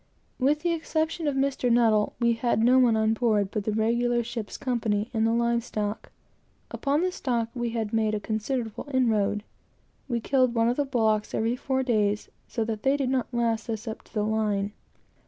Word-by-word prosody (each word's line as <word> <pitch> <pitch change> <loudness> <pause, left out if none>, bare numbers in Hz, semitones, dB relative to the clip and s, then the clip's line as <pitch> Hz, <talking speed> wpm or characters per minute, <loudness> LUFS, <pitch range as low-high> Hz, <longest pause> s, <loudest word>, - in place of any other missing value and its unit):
With 290 +3 +2
the 345 +1 +1
exception 320 0 -1
of 285 - 0
Mr. 270 -1 0
N., 230 -3 +3
we 235 -1 +3
had 235 -1 0
no 255 +2 +6
one 240 -3 +4
on 220 0 +2
board 215 -4 +1
but 210 -2 -3
the 215 - 0
regular 235 +2 +1
ship's 230 -2 -5
company, 230 -4 -1
and 225 -1 +2
the - - +2
live 235 0 +1
stock. 210 -2 -4 0.6
Upon 285 +2 0
this, 365 0 -2 0.3
we 240 -1 -2
had 225 -2 -3
made 220 -1 +1
a - - -1
considerable 220 +3 -3
inroad. 210 -5 +1 0.6
We 240 -3 -1
killed 255 0 +2
one 230 0 +3
of 245 - -1
the 290 - +1
bullocks 220 -5 +1
every 225 +2 +1
four 265 +1 -1
days, 210 -4 0 0.2
so 230 - -2
that 220 -1 -3
they 270 +1 +2
did 265 -2 -1
not 260 -2 -1
last 230 -2 -1
us 225 +1 -4
up 220 - -5
to - - -24
the 210 - +1
line. 210 -2 0
235 Hz, 190 wpm, -26 LUFS, 220-255 Hz, 0.6 s, no